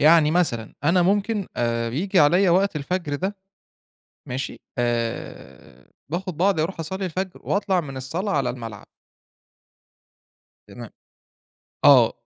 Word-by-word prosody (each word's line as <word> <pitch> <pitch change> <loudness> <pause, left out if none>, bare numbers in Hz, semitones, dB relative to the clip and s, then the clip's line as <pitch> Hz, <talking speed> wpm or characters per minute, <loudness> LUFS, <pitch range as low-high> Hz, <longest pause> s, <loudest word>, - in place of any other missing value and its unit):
يعني 155 0 +6
مثلًا 155 -10 0
أنا 175 +3 +4
ممكن 200 +2 +1
آآ، 115 -1 0
بييجي 180 - +1
عليّا 175 +6 +5
وقت 190 0 +2
الفجر 150 0 -2
ده، 190 +7 -2 0.9
ماشي؟ 130 +2 -5 0.2
آآ، 120 -1 -4 0.2
باخد 180 0 -3
بعضي 185 -1 +2
أروح 170 +1 -3
أصلي 190 +5 -4
الفجر 185 +2 -4
وأطلع 195 -2 +1
من 135 -5 -8
الصلاة 165 +10 -3
على 135 -4 +1
الملعب. 115 -4 -8 1.8
تما - - -10 0.9
آه، - - +7
165 Hz, 115 wpm, -23 LUFS, 130-190 Hz, 1.8 s, آه